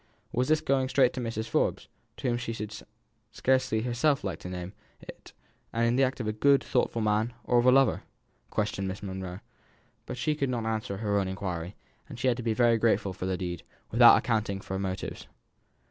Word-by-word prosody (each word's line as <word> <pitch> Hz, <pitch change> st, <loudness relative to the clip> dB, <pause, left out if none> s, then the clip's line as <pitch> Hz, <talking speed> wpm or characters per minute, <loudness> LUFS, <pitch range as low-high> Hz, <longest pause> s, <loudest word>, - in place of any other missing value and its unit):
Was 125 Hz, +2 st, 0 dB
this 155 Hz, 0 st, +3 dB
going 130 Hz, -1 st, +1 dB
straight 130 Hz, -2 st, +3 dB
to 130 Hz, -, -4 dB
Mrs. 115 Hz, -1 st, -3 dB
Forbes, -, -, 0 dB, 0.3 s
to -, -, -3 dB
whom 120 Hz, -1 st, +1 dB
she 120 Hz, -1 st, -4 dB
should 105 Hz, -1 st, -5 dB
herself 105 Hz, 0 st, -10 dB, 0.4 s
scarcely 130 Hz, -3 st, +1 dB
have 125 Hz, +4 st, +1 dB
liked 95 Hz, -5 st, -4 dB
to 90 Hz, -, -7 dB
name 90 Hz, +1 st, -6 dB, 0.3 s
it, -, -, -12 dB, 0.4 s
the 115 Hz, +3 st, +2 dB
act 130 Hz, 0 st, 0 dB
of 120 Hz, -, -3 dB
a 110 Hz, -, 0 dB
good, 140 Hz, +5 st, +4 dB
thoughtful 115 Hz, -3 st, 0 dB
man, 110 Hz, +3 st, +1 dB
or 120 Hz, -, +3 dB
of 120 Hz, -, +2 dB
a -, -, +8 dB
lover? 135 Hz, 0 st, +4 dB, 0.5 s
questioned 105 Hz, -2 st, -1 dB
Miss 95 Hz, +2 st, -5 dB
Monro; 95 Hz, -1 st, -6 dB, 0.7 s
but -, -, -5 dB
she 150 Hz, +4 st, 0 dB
could 140 Hz, -3 st, -1 dB
not 120 Hz, -3 st, -2 dB
answer 110 Hz, -3 st, -2 dB
her 100 Hz, -1 st, 0 dB
own 95 Hz, -, -1 dB
inquiry, 95 Hz, -2 st, -4 dB, 0.3 s
and 125 Hz, -5 st, -9 dB
had 125 Hz, -1 st, +1 dB
to -, -, -4 dB
be 115 Hz, -2 st, -1 dB
very 120 Hz, -1 st, +4 dB
grateful 110 Hz, -4 st, +1 dB
for 95 Hz, 0 st, -5 dB
the 95 Hz, -1 st, -1 dB
deed, 90 Hz, -2 st, -4 dB, 0.3 s
without -, -, +8 dB
accounting 105 Hz, -3 st, -1 dB
for 95 Hz, -, -7 dB
the 95 Hz, -, -1 dB
motives. 95 Hz, -1 st, -4 dB
110 Hz, 205 wpm, -28 LUFS, 95-125 Hz, 0.7 s, a